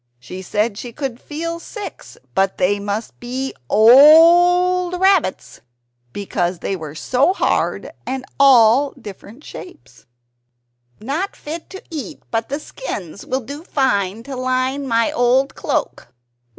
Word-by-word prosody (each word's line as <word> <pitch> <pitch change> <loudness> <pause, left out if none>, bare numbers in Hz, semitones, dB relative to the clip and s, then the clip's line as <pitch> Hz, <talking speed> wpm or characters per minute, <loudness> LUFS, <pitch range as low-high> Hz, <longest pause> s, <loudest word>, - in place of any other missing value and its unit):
She 180 +10 -9
said 210 +3 -2
she 245 - -7
could 265 -2 -5
feel 335 +3 -5
six, 415 +4 -9 0.2
but 195 0 0
they 195 +3 +1
must 205 +2 -5
be 260 +2 -4 0.2
OLD 350 - +6
rabbits, 380 - +1 0.5
because 180 -1 -2
they 195 +3 -3
were 155 -4 -8
so 260 - +1
hard - - -1
and 260 0 -5
all 270 0 +5
different 215 +4 -12
shapes. 355 - -13 0.9
"Not 295 - -3
fit 320 +2 -8
to 385 - -10
eat; 305 -1 -7
but 225 0 -2
the 285 +3 -3
skins 200 - -8
will 260 +1 -1
do 285 +6 -9
fine 220 - -1
to 270 +1 -7
line 255 +2 -1
my 230 -2 +1
old 250 +3 +2
cloak." - - -3
255 Hz, 130 wpm, -19 LUFS, 210-310 Hz, 0.9 s, OLD